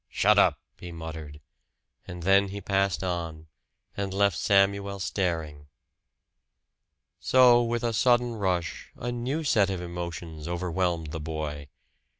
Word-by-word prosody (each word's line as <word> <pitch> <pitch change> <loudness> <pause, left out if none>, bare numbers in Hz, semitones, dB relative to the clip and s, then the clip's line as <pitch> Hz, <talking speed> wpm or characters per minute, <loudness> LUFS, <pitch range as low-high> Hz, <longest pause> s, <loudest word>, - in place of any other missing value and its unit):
"Shut - - +4
up!" - - +4 0.2
he 90 - -8
muttered; 80 -3 -8 0.7
and 90 -1 -7
then 100 +2 +4
he 100 +1 -6
passed 100 -2 0
on, 85 -3 -4 0.5
and 100 -1 -3
left 100 -1 +2
Samuel 100 +1 +2
staring. 80 -7 -3 1.5
So 125 -2 +6
with 120 0 -2
a 115 -1 0
sudden 120 +1 +3
rush, 90 -6 -2
a 120 - -4
new 125 +7 -2
set 105 -9 +3
of 95 -2 -2
emotions 85 -2 -6
overwhelmed 85 -2 -2
the 80 - -4
boy. 75 -2 -5
95 Hz, 130 wpm, -27 LUFS, 80-100 Hz, 1.5 s, So